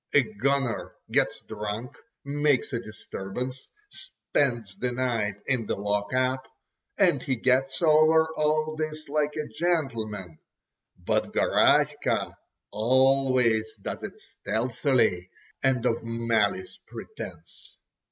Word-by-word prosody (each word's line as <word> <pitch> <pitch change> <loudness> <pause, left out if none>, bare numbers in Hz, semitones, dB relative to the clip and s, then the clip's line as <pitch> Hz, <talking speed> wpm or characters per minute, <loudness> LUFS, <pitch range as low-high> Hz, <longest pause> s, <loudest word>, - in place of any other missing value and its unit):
A 145 - +7
"gunner" 140 - -1 0.2
gets - - +1
drunk, 105 +3 -5 0.3
makes 145 -2 +1
a 120 - 0
disturbance, 115 +3 -6 0.2
spends 120 -8 -2
the 125 0 0
night 120 -5 -1
in 125 -5 0
the - - 0
lock 100 0 -1
up, 130 0 0 0.5
and - - +3
he 130 - -1
gets 130 +4 +1
over 160 0 +5
all 155 +1 +1
this 155 0 -4
like 150 0 0
a 155 -1 -3
gentleman—but 115 - -3
Garaska - - +2 0.4
always 130 -1 +3
does - - -5
it - - -7
stealthily, 115 -5 0 0.3
and 130 -2 +2
of 115 -2 +1
malice 115 - 0
prepense. 440 - -10
130 Hz, 105 wpm, -27 LUFS, 110-145 Hz, 0.5 s, A